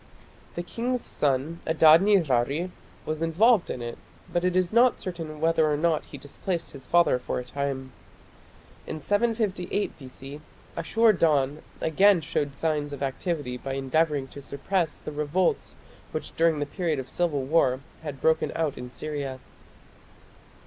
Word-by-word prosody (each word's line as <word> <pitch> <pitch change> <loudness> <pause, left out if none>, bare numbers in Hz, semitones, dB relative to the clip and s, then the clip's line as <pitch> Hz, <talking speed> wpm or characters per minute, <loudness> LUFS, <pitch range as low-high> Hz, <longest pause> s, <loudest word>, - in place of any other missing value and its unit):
The 175 - -3
king's 245 +6 -2
son 145 +4 0
Adad 160 +1 +7
nirari 165 - +2 0.3
was 155 0 -3
involved 190 +6 +3
in 120 - -4
it, 120 0 -6 0.3
but 175 - +1
it 180 0 +1
is 185 +1 +1
not 240 +1 +5
certain 165 -4 -6
whether 160 -1 +3
or 145 - +1
not 160 0 +1
he 145 - -10
displaced 170 +5 -4
his 135 -3 -11
father 170 -7 +4
for - - -3
a 125 - -4
time. 135 0 -3 1.0
In 155 - -4
758 205 0 0
B.C. 135 +2 -10 0.3
Ashur 220 +7 +3
dan 150 -4 +2 0.2
again 190 +4 +5
showed 145 -1 -2
signs 150 -1 -1
of 140 - -5
activity 135 -2 -2
by 135 +2 -5
endeavouring 140 +1 0
to 140 - -10
suppress 160 +4 -2
the - - -7
revolts 150 +5 0 0.4
which - - -5
during 165 -1 +3
the 145 - -1
period 165 0 -2
of 130 -1 -5
civil 155 -5 0
war 135 -3 +2 0.2
had 145 -4 -6
broken 160 0 +2
out 155 -5 -1
in 125 0 -7
Syria. 135 +1 -5
155 Hz, 150 wpm, -26 LUFS, 140-175 Hz, 1.0 s, Adad